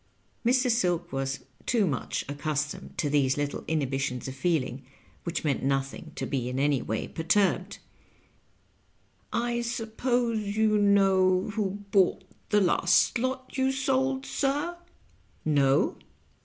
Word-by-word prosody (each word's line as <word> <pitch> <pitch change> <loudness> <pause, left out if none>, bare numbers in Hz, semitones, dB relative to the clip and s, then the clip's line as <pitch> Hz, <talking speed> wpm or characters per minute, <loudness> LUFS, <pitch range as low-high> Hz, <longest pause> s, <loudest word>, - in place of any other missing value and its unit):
Mr. 250 +1 +3
Silk 175 -6 0
was 135 0 -2 0.3
tob 235 -2 +2
mnch 150 - -1
accostomed 150 +1 -3
to 150 - 0
these 140 -2 +2
little 145 0 -2
ex 160 -2 +1
hibitions 135 -1 -2
of 130 - -5
feeling, 135 -3 -1 0.4
which 170 - -2
meant 145 -3 0
nothing, 135 +3 -2
to - - -3
be 125 -3 -2
in 125 - -3
any 140 -2 +2
way 110 - -3
perturbed. 180 +5 +1 0.8
" - - -39 0.2
I 235 0 0
suppose 235 0 -1 0.2
you 215 -1 +3
know 195 -1 +3
who 205 -1 -2
bought 195 -1 +3 0.3
the 210 -1 +4
last 180 +4 +3
lot 260 +1 -3
you 265 0 +3
sold, 265 0 0
sir?" 290 +5 -1 0.7
"No." 140 -3 +3
185 Hz, 130 wpm, -28 LUFS, 140-230 Hz, 0.8 s, the